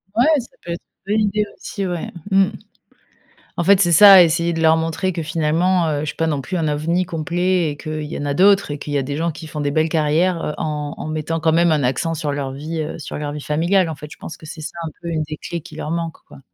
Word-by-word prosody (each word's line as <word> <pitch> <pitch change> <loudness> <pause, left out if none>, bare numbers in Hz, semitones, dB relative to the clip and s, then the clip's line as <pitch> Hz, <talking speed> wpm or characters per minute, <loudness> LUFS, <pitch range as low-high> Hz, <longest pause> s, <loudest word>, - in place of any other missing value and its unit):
Ouais, 240 +3 +4
ça 245 - -7 0.2
peut 170 - -6
être 170 - -4 0.3
une 205 - +1
bonne 215 - +3
idée 210 +1 0
aussi, 200 -2 -5
ouais. 175 -2 -4 0.2
Mmh. 195 0 +5 1.1
En 175 - +1
fait, 200 +2 +5
c'est 175 -3 +3
ça: 195 +1 +10
essayer 170 +1 +1
de 165 - -2
leur 160 0 +5
montrer 165 +3 -1
que 170 -2 -4
finalement, 165 +3 +1
heu, 150 -2 -1
je - - -3
suis 150 - -4
pas 165 - 0
non 145 -3 -1
plus 180 +7 -4
un 160 -2 0
ovni 165 +5 0
complet 175 +1 0
et 145 - -8
qu'il 155 0 -5
y 150 - -5
en 145 - -4
a 145 - 0
d'autres 195 +1 +4
et 145 - -4
qu'il 145 - -5
y - - +2
a 140 - 0
des 140 +2 -4
gens 165 +1 0
qui 160 +1 -10
font 150 - -6
des 145 0 0
belles 155 +2 +1
carrières, 165 +3 +1
heu, 150 - -2
en 150 -1 -3
en - - -6
mettant 155 +1 -2
quand 160 0 +2
même 170 0 +4
un 150 -3 +2
accent 130 +6 0
sur 150 -2 -2
leur 140 -2 -3
vie, 155 +4 -5
heu, 155 +2 -5
sur 150 - -6
leur 145 0 -4
vie 150 - -6
familiale 170 +5 +1
en 160 - -4
fait. 150 +2 -9
Je - - -11
pense - - -9
que - - -14
c'est 155 +1 -8
ça, 155 - -7
un 165 - -3
peu, 170 - -5
une 160 -2 -1
des 155 0 -7
clés 170 -1 -5
qui - - -13
leur 155 - -5
manque, 165 -1 -2
quoi. - - -14
160 Hz, 285 wpm, -20 LUFS, 150-175 Hz, 1.1 s, ça